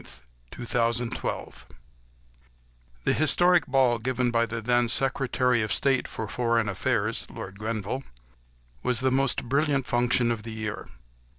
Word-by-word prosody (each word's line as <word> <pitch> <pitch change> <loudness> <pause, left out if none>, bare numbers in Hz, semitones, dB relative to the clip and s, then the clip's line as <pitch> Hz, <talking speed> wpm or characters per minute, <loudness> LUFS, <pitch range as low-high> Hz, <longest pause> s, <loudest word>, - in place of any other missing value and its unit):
LORD 120 - -7
GRENVILLE'S 115 0 +1
BALL - - -4 1.5
The - - +2
historic 175 +2 +3
ball 130 -3 +3
given 125 +1 0
by 115 0 +2
the 115 +1 -4
then 120 +1 +1
Secretary 125 -2 +1
of 110 -1 -2
State 135 +3 +1
for 110 - -5
Foreign 115 -1 0
Affairs—Lord 100 0 -2
Grenville—was 65 - -5
the 130 0 +2
most 135 0 +1
brilliant 140 +1 +1
function 120 0 +2
of 115 -2 -2
the 110 0 -7
year. 110 -1 -5
120 Hz, 125 wpm, -26 LUFS, 110-130 Hz, 1.5 s, historic